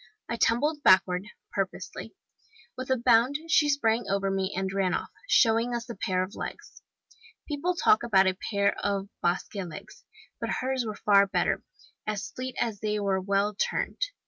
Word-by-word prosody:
I - - -2
tumbled 290 +7 +1
backward, 185 -3 +4 0.2
purposely. 195 -2 -4 0.6
With 255 +1 -6
a 260 - +3
bound 240 +3 +4
she 300 -2 +4
sprang 235 -5 +1
over 195 0 0
me, 195 0 -1
and 190 0 -2
ran 195 -2 +1
off, - - -4 0.2
showing 230 +1 +4
us 235 0 -4
a 235 - -5
pair 185 -3 0
of 190 +3 -7
legs! - - -8 0.7
People 320 +5 -1
talk 430 +3 +4
about 195 -5 +4
a 190 -1 +2
pair 200 -1 +2
of 200 -1 -1
Basque 175 +4 -1
legs! 185 -5 -8 0.4
but - - -3
hers 260 -1 -1
were 215 - -4
far 200 -1 +4
better - - 0 0.5
as 215 +6 -3
fleet 255 0 -6
as 220 -4 -1
they 210 0 -1
were 195 -2 0
well 200 +2 +1
turned. 200 - -2
210 Hz, 170 wpm, -27 LUFS, 195-250 Hz, 0.7 s, backward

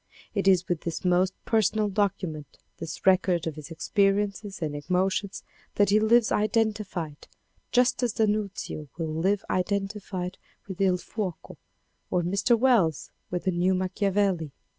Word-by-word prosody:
It 200 -2 0
is 185 -1 +4
with 175 -3 -1
this 170 +2 -4
most 180 +1 +2
personal 215 -1 +2
document, 185 -7 -2 0.2
this 165 - -7
record 185 -3 +3
of 160 - -2
his 150 -1 -9
ex 160 - -7
periences 200 0 +1
and 155 -4 -3
emotions 185 +5 -1 0.3
that 205 -1 +3
he 210 - +5
lives 225 +1 +4
identified, 210 -8 -1 0.4
just 250 +1 +3
as 240 -3 +1
D'Annunzio 205 -7 -1
will 160 -2 -3
live 190 +5 0
identified 195 -1 -2 0.3
with 190 -3 -7 0.2
// - - -14
Fuoco 195 -7 -5 0.5
or 180 -1 +1
Mr. 200 +7 +2
Wells 220 - +2 0.2
with 180 0 -3
the 190 - +1
New 180 +2 +2
Macchiavelli. 185 -2 0
190 Hz, 140 wpm, -27 LUFS, 175-210 Hz, 0.5 s, he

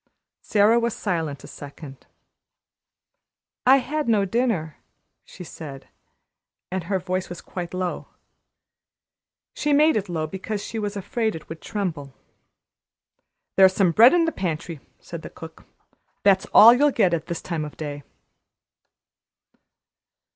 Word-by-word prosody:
Sara 215 +3 +3
was 235 -1 -1
silent 160 -8 -3
a - - -10
second. 140 -1 -11 1.6
"I 265 +1 +8
had 295 +1 -2
no 210 -3 +3
dinner," 195 - -1 0.5
she - - -12
said, 140 -5 -10 0.8
and 185 -2 -3
her 195 +2 0
voice 185 0 -3
was 175 - -7
quite 175 -2 -7
low. 185 -1 -4 1.5
She 295 0 0
made 305 +2 +4
it 205 -3 -2
low, 160 -2 -2
because 195 +6 -5
she 225 - -5
was 205 -1 -3
afraid 220 +2 -2
it 160 - -10
would 160 0 -8
tremble. 165 -10 -4 1.4
"There's 190 -1 +6
some 190 -4 +3
bread 235 - +7
in 340 -1 +3
the 325 - 0
pantry," 165 - -4 0.2
said - - -9
the - - -9
cook. - - -12 0.6
"That's 195 -1 +3
all 230 +3 +8
you'll 290 +4 +4
get 195 -10 +2
at 165 -2 -2
this 170 -1 -5
time 165 -3 -3
of 150 - -9
day." 145 -2 -6
185 Hz, 135 wpm, -23 LUFS, 160-225 Hz, 1.6 s, I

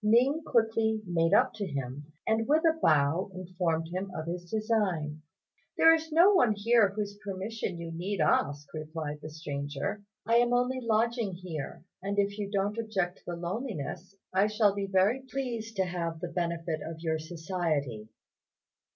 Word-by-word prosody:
Ning 250 +8 +4
quickly 225 -3 +2
made 165 -2 +1
up 250 +6 +4
to 205 -2 -3
him, 140 +1 -5
and 220 0 +1
with 310 +3 +4
a 325 0 +5
bow 155 +4 +3
informed 175 -3 -1
him 185 +3 -3
of 155 - -4
his 175 +1 -5
design. 190 -9 0 0.6
"There 325 - +8
is 320 0 -1
no 345 +6 +7
one 245 - +5
here 215 0 +4
whose 205 0 -4
permission 195 -1 -4
you 170 0 -6
need 180 +4 -3
ask," 145 -1 +2
replied 155 -1 -5
the 155 - -7
stranger; 145 +4 -4 0.2
"I 230 +2 +4
am 240 0 +3
only 250 +1 +2
lodging 230 -2 +1
here, 170 -6 -6 0.2
and 200 +2 -3
if 200 +1 +1
you 200 -1 -2
don't 205 +2 0
object 195 -6 -1
to - - -29
the 175 - -3
loneliness, 185 - -4 0.2
I 195 +2 +4
shall 210 -1 +3
be 200 -1 -2
very 195 +7 +3
pleased 235 -4 -3
to 190 -1 +2
have 170 -2 -3
the 175 0 -4
benefit 170 -2 -2
of 160 0 -7
your 160 -1 0
society." 155 - -2
190 Hz, 170 wpm, -30 LUFS, 165-220 Hz, 0.6 s, There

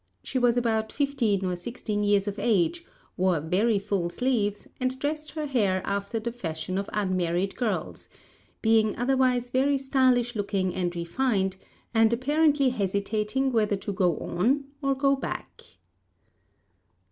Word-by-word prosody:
She 260 - -2
was 245 -1 +3
about 220 -2 0
fifteen 240 -9 0
or 180 -1 -1
sixteen 210 +2 -4
years 205 -1 +2
of 205 0 -3
age, 220 - +1 0.3
wore 185 -3 +2
very 200 +8 +1
full 195 -3 -1
sleeves, 210 -1 -1
and 255 0 -1
dressed 300 +3 -3
her 310 -1 -3
hair 205 -9 +1
after 200 +3 -2
the 235 +2 -3
fashion 185 -4 -4
of 200 - -4
unmarried 185 -2 0
girls, 200 -9 -3 0.5
being 220 -1 +3
otherwise 250 -1 +1
very 275 +2 +2
stylish 255 -3 +2
looking 195 -3 -1
and 175 -1 -2
refined, 190 +2 0 0.4
and 225 -1 +4
apparently 285 +2 +3
hesitating 210 +4 -1
whether 215 -3 +2
to 200 +1 -5
go 180 -4 +1
on 255 +11 0 0.2
or 275 -1 +1
go 275 0 +3
back. 270 - -6
220 Hz, 140 wpm, -27 LUFS, 195-260 Hz, 0.5 s, and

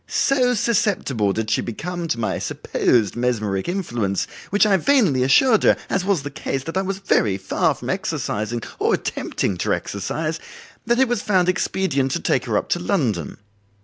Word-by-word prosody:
So 255 -2 +2
susceptible 200 - +1
did 110 +2 -2
she - - +2
become 170 +9 -5
to 115 - -1
my 110 - -1
supposed 110 -5 0
mesmeric 110 - -1
influence, 120 - -1 0.2
which 205 +2 +4
I 205 -2 +4
vainly 190 - +3
assured 215 - +4
her, - - +4
as 190 - +1
was 190 -6 0
the 145 - -5
case, 135 -1 -3
that 165 +4 -6
I 190 - +2
was 195 0 -3
very 110 - +1
far 95 - 0
from - - -4
exercising 110 +3 -2 0.2
or - - +3
attempting 95 - -3
to - - +1
exercise, 155 - -3 0.5
that 235 0 +3
it 265 0 +4
was 240 -3 -1
found 185 -3 +2
expedient 180 -7 0
to - - 0
take 130 - 0
her 110 -4 0
up - - -2
to 175 - +1
London. 120 - -1
155 Hz, 180 wpm, -22 LUFS, -, 0.5 s, which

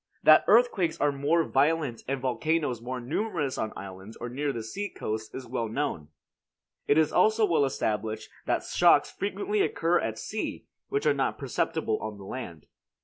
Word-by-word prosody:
That 155 - +8
earthquakes 210 -7 +3
are 145 0 +3
more 145 +4 +2
violent 145 -4 +1
and 135 +1 -1
volcanoes 130 0 0
more 125 +2 -4
numerous 150 - -2
on 110 - -2
islands 95 +2 -9
or 120 - -5
near 140 +4 -1
the 115 -4 -5
sea 200 - -4
coast 110 0 -5
is 130 - -6
well 115 -1 -2
known. 110 - -2 0.8
It 145 - +4
is 155 -1 +3
also 220 0 +4
well 160 -7 +3
established 110 -4 -2 0.2
that - - +1
shocks - - +4
frequently 205 +1 -1
occur 165 +3 +2
at 110 -1 -3
sea, 215 - -4 0.2
which 420 +1 -1
are - - +5
not - - -1
perceptible 135 -9 -1
on 110 -1 -5
the 100 - -11
land. 90 - -7
140 Hz, 170 wpm, -28 LUFS, 110-165 Hz, 0.8 s, That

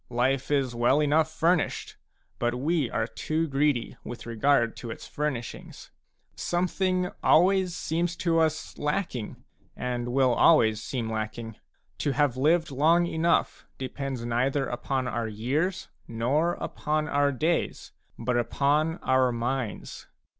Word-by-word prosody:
Life 125 +2 0
is 135 -4 +1
well 120 +4 +3
enough 150 +1 +3
furnished, 165 +1 0 0.4
but 120 0 0
we 145 0 0
are - - -1
too 160 +1 -2
greedy 140 -4 0
with 120 - -8
regard 115 +1 +2
to 120 - -7
its 115 - -7
furnishings; 140 -6 -5 0.4
something 180 +1 0
always 185 +1 +4
seems 170 +2 -1
to 170 -1 +1
us 155 -1 -1
lacking, 150 - -3 0.3
and 125 -1 -3
will 130 0 +3
always 110 -8 +4
seem 120 0 -3
lacking. 110 0 -4 0.4
To 145 - 0
have 145 -4 +2
lived 160 +4 +2
long 160 +6 +3
enough 170 0 0
depends 135 -2 -4
neither 130 +4 0
upon 130 +1 -2
our 120 -2 -2
years 140 - -1 0.2
nor 135 +9 +1
upon 155 0 -2
our 145 -1 +2
days, 160 +6 -1 0.3
but 125 -1 -1
upon 145 +7 +1
our 130 -1 +3
minds. 120 -1 -4
140 Hz, 130 wpm, -27 LUFS, 120-160 Hz, 0.4 s, always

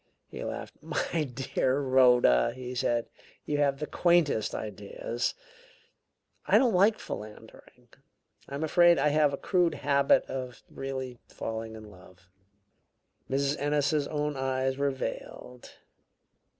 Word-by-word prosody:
He - - -7
laughed. - - -6
"My 160 -3 -2
dear 130 +1 0
Rhoda," 125 - +4
he 125 -1 -6
said, 120 -2 0 0.4
"you 145 -1 -1
have 140 -1 +2
the 150 - -3
quaintest 170 -10 +2
ideas. 105 +3 -4 1.1
I - - +6
don't 245 -5 +3
like 200 +4 +4
philandering; 105 0 -10 0.6
I'm 140 +3 -4
afraid 175 +2 +5
I 150 - +3
have 150 -1 +3
a 140 - -3
crude 175 -2 +1
habit 140 -1 +3
of 130 -2 -6
really 130 -2 -5
falling 110 0 -5
in 110 -1 -11
love." 90 -1 -18 1.0
Mrs. 140 +2 0
Ennis's 145 0 +1
own 150 -1 -2
eyes 130 0 -1
were 140 +1 +1
veiled. 125 -2 -7
135 Hz, 125 wpm, -28 LUFS, 125-150 Hz, 1.1 s, I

